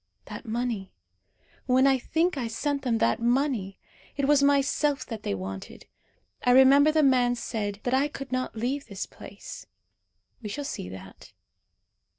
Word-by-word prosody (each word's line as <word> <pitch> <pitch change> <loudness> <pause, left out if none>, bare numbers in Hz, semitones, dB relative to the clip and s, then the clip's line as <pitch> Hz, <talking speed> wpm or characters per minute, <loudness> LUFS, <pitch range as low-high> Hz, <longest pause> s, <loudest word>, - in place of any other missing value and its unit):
That 210 +4 -9
money. 230 -4 -3 0.8
When 260 +1 +4
I 270 -1 +4
think 325 +7 0
I 250 -4 -2
sent 280 +5 -2
them 245 -4 0
that 220 - +1
money! 240 -5 0 0.4
It 280 -1 +1
was 290 -1 +5
myself 280 0 +2
that 225 -3 -6
they 100 - -2
wanted. 95 0 -7 0.6
I - - +2
remember 275 +3 +7
the 310 0 +3
man 250 -3 +3
said 205 -4 -4
that 245 - -1
I 270 +2 +3
could 275 -3 -8
not 255 -1 -2
leave 260 +6 -2
this 200 -1 -5
place. - - -11 0.7
We 210 - -6
shall 285 +8 -4
see 90 - -5
that. 95 0 -12
255 Hz, 160 wpm, -27 LUFS, 220-280 Hz, 0.8 s, remember